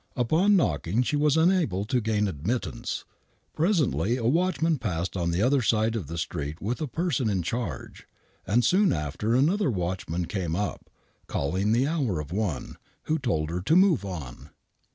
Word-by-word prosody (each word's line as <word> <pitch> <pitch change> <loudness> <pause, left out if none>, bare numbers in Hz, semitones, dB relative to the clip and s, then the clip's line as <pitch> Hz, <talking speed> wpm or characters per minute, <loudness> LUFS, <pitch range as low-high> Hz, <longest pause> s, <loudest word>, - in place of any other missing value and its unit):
Upon 160 - +3
knocking 95 - +1
she 150 - -1
was 150 +1 +3
unable 160 - +2
to 125 +2 0
gain 105 -1 +1
admittance. 80 - -3 0.5
Presently 140 - +1
a 115 - -3
watchman 165 +2 +1
passed 90 -5 -3
on 85 -2 0
the 85 +4 +1
other 135 +2 +3
side 110 0 +1
of 100 -10 -3
the 85 +3 -6
street 80 -2 -4
with 120 +9 -3
a 155 - -1
person 155 -5 -1
in 95 -4 0
charge, 115 +7 -5 0.4
and 115 +6 +3
soon 195 +2 +4
after 80 - -1
another 160 +7 +2
watchman 90 -3 -2
came 85 -4 -3
up,, 100 +2 -3 0.4
calling 95 +9 -1
the 120 +4 +3
hour 140 - 0
of 75 0 -6
one, 95 -8 -3 0.3
who 160 +1 0
told 80 - -1
her 90 +1 -2
to 150 - +2
move 185 - +4
on. 80 -11 -7
110 Hz, 170 wpm, -26 LUFS, 85-145 Hz, 0.5 s, soon